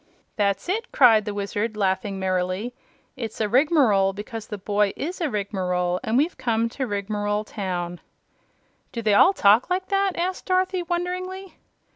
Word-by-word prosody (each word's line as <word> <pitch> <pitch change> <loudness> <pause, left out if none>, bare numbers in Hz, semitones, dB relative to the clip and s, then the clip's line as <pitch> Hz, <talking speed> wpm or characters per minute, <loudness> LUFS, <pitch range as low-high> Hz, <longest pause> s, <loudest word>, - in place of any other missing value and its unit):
"That's 200 - 0
it!" 445 +6 -1
said 225 -5 +7
the 210 - -3
Wizard, 205 +2 -2
laughing 195 0 0
merrily. 185 +4 -1 0.4
"It's 230 -5 -6
a 215 - +1
rigmarole 240 - +3
because 215 +2 -7
the 210 - -5
boy 205 0 0
is 355 +5 -5
a 320 - +1
Rigmarole 185 -4 -1
and 225 - 0
we've 305 +4 +1
come 230 -2 0
to 265 +2 -4
Rigmarole 205 0 -2
Town." 180 -5 -4 0.9
"Do 230 - -5
they 215 -1 +3
all 365 - +6
talk 215 - +4
like 370 +1 -1
that?" 390 -2 +1
asked 365 +2 -2
Dorothy, 370 0 +1
wonderingly. 365 +2 -4
215 Hz, 155 wpm, -24 LUFS, -, 0.9 s, said